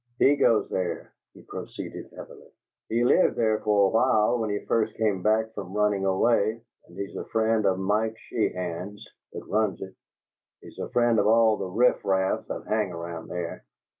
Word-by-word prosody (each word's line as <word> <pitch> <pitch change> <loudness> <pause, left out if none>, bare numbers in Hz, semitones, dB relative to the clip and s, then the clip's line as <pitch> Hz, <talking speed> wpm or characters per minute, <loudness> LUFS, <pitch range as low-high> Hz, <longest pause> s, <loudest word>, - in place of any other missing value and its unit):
"He 140 +3 +5
goes 115 -5 +3
there!" 90 -2 -3 0.2
he - - -15
proceeded - - -8
heavily. - - -12 0.4
"He 115 +2 +1
lived 120 - +4
there 110 -2 +1
for 105 -2 +3
a - - +3
while 115 +1 +2
when 110 -1 -1
he 105 0 -3
first 110 -1 0
came 105 -4 0
back 110 +2 +1
from 100 -2 -7
running 105 -2 +1
away, 110 +3 +2 0.3
and 85 - -16
he's 100 0 -6
a - - -5
friend 110 -2 +1
of 95 -1 +2
Mike 105 +3 0
Sheehan's 90 -2 -4 0.3
that - - -7
runs 105 -4 0
it; 95 - -8 0.7
he's - - -14
a - - -4
friend 120 -2 +2
of 100 - +2
all 110 0 +5
the 95 - -4
riff 120 +7 +2
raff 95 -1 0
that - - -6
hang 105 -3 0
around 85 -1 -7
there." 90 -1 -5
105 Hz, 180 wpm, -26 LUFS, 95-110 Hz, 0.7 s, He